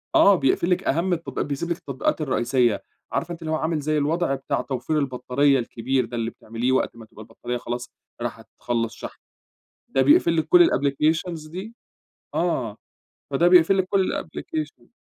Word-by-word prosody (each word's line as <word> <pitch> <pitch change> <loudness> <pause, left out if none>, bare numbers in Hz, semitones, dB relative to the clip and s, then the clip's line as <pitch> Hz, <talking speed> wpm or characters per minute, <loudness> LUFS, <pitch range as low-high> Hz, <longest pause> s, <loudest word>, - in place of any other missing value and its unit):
آه، 200 -1 +7
بيقْفل 165 +4 +1
لِك 180 +1 +1
أهم 170 +5 +1
التط 160 -6 -4
بيسيب 145 +4 -2
لِك 170 - -1
التطبيقات 140 +3 -2
الرئيسية. 125 -4 +1 0.3
عارفة 175 - -2
أنتِ 170 0 -7
اللي 160 -1 -4
هو - - +2
عامل 160 0 -1
زي 155 +1 0
الوضع 155 0 +1
بتاع 135 - -2
توفير 135 +3 -2
البطاريّة 135 +1 +1
الكبير 125 +2 -1
ده، 120 +1 -6
اللي 115 0 -1
بتعمليه 115 +3 -3
وقت 130 - +1
ما 115 -1 -11
تبقى 110 - -14
البطاريّة 120 +2 -5
خلاص 120 0 -5 0.3
راحة - - -5
تخلّص 115 -1 -1
شحن. - - -9 0.7
ده 135 - +2
بيقْفل 165 +4 +4
لِك 160 - +1
كل 355 -1 +7
الapplications 155 +3 0
دي، 200 +7 -7 0.6
آه، 125 -11 -1 0.6
فده 170 +6 +4
بيقْفل 180 +2 +6
لِك 185 - +3
كل 195 -2 +2
الapplication. 320 +2 -6
145 Hz, 170 wpm, -24 LUFS, 125-170 Hz, 0.7 s, آه